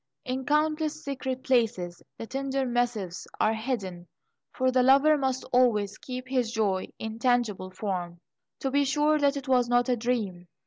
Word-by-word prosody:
In 260 +1 -3
countless 310 +1 +1
secret 260 -2 -4
places, 225 -9 0 0.2
the - - -6
tender 270 +2 -2
missives 240 -7 -2
are 215 - +3
hidden, 205 -7 -4 0.4
for 260 -1 +1
the 255 0 +3
lover 275 +4 +6
must 265 -2 -1
always 215 -5 +3
keep 255 0 -6
his 250 -3 0
joy 205 -5 0
in 220 0 -6
tangible 230 -6 +1
form, 180 -3 -4 0.4
to 270 - -1
be 285 +1 +3
sure 295 +2 +2
that 285 0 +2
it 275 - -6
was 250 -2 +3
not 245 0 +3
a 250 - +3
dream. 220 -7 -2
250 Hz, 165 wpm, -27 LUFS, 215-270 Hz, 0.4 s, lover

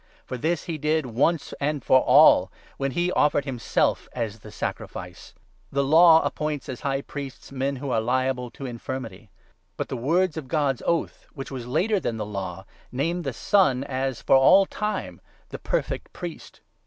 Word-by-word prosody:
For - - -5
this 160 +6 -1
he 165 -3 -5
did 155 0 +1
once 140 +7 0
and 145 0 -1
for 130 - +5
all, - - +6 0.3
when 135 -1 -2
he 175 +1 0
offered 145 -4 +2
himself 125 -4 0
as 115 -3 -4
the 105 0 -12
sacrifice. - - -6 0.4
The 140 0 +1
Law 160 +3 +7
appoints 150 -2 -3
as 130 - -6
High 140 -1 -1
28 - - -25
Priests 140 -2 -8
men 135 +1 -2
who 135 0 -5
are 115 - +2
liable 125 +1 0
to 135 - -9
infirmity; 115 -4 -6 0.5
but - - -3
the - - -3
words 165 +7 +1
of 150 -5 -5
God's 140 -3 0
oath, 170 -1 -1
which 135 -1 -7
was 125 -3 -6
later 200 - +1
than 115 -10 -3
the 105 - -3
Law, 95 -2 -6 0.3
name 165 +7 -1
the 140 -5 -3
Son 140 - +2
as, 130 -2 -3
for - - +4
all 190 +9 +6
time, 210 +2 -4 0.3
the - - -7
perfect - - -3
Priest. 175 -2 -8
135 Hz, 180 wpm, -25 LUFS, 125-160 Hz, 0.5 s, Law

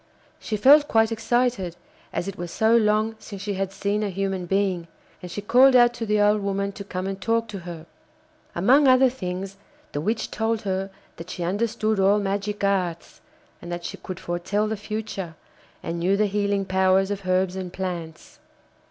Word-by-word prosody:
She 215 - -3
felt 290 +7 +6
quite 225 -2 +3
excited, 225 -5 0 0.4
as 175 - -3
it 195 - -4
was 175 0 -6
so 220 +6 +3
long 215 0 +2
since 205 -2 -9
she 205 0 -2
had 195 0 -2
seen 200 +2 -1
a 210 - -1
human 190 -1 -2
being, 190 -3 0 0.3
and 180 - -8
she 205 +4 -6
called 255 +5 +6
out 240 -1 +6
to 230 -2 -5
the 210 0 +2
old 210 0 +3
woman 200 0 -1
to 200 - -8
come 185 -1 -5
and 195 0 -4
talk 230 0 +1
to 200 -2 -6
her. 170 -2 -8 0.7
Among 260 +11 +5
other 255 0 +6
things 190 -4 -5 0.3
the 145 - -3
witch 220 +7 -2
told 225 0 -1
her 195 -1 -2 0.3
that 165 +2 -9
she 180 - -4
understood 215 +3 0
all 195 +2 +4
magic 200 +1 -2
arts, 185 -4 -1 0.4
and 175 - -8
that 175 0 -5
she - - -5
could 185 -1 -7
foretell 175 +5 -1
the 220 - -2
future, 210 -5 -5 0.5
and 170 +1 -3
knew 190 +4 +2
the 210 - +3
healing 200 -1 0
powers 190 +1 +2
of 200 -2 -5
herbs 185 0 +1
and 185 -2 -5
plants. 175 -4 -6
200 Hz, 185 wpm, -24 LUFS, 185-215 Hz, 0.7 s, felt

